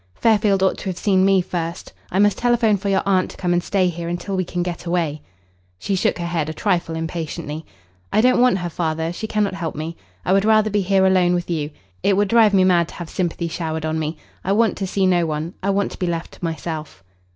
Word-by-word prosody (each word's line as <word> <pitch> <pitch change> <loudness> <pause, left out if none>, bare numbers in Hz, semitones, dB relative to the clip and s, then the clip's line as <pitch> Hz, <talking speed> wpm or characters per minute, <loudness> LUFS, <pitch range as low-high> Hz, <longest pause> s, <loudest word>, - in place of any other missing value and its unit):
Fairfield 205 - +3
ought 190 - +2
to - - -8
have 180 - -4
seen 190 -2 +2
me 195 -1 +4
first. 170 -1 -5 0.2
I 185 - -2
must 205 -1 +3
telephone 240 -3 +3
for 200 +1 -3
your 195 -1 +2
aunt 190 -2 +2
to - - -12
come 175 -1 0
and 175 - +2
stay 190 -1 +1
here 170 -1 -4
until 175 +3 -3
we 185 - +1
can 175 0 -3
get 175 0 -5
away." 165 -4 -1 0.6
She 195 - -3
shook 185 - +1
her 170 - -3
head 165 -3 -1
a - - -4
trifle 165 0 0
impatiently. 160 -1 -5 0.4
"I - - +3
don't 250 +2 +4
want 250 -6 +4
her, 175 -2 -3
father. 160 0 -2
She 220 - -5
cannot 210 -2 0
help 175 -4 -4
me. 160 +2 -5 0.3
I 185 - +2
would 195 0 +4
rather 215 0 +4
be 205 0 +2
here 190 0 +3
alone 180 -2 +4
with 175 0 -3
you. 150 -3 -1 0.3
It 195 - +2
would 205 -1 +2
drive 230 -2 +5
me 190 - +5
mad 175 -3 +3
to - - -12
have 175 -2 -7
sympathy 170 -2 -2
showered 160 -1 -3
on 160 0 -1
me. 155 +1 -3 0.3
I 195 - +1
want 225 +2 +3
to 195 - -2
see 195 +1 +1
no 175 -2 +3
one. 155 +3 -3
I 195 - -1
want 200 0 +1
to - - -10
be 180 - -1
left 170 -1 -3
to - - -16
myself." 160 - -5
180 Hz, 245 wpm, -21 LUFS, 165-195 Hz, 0.6 s, drive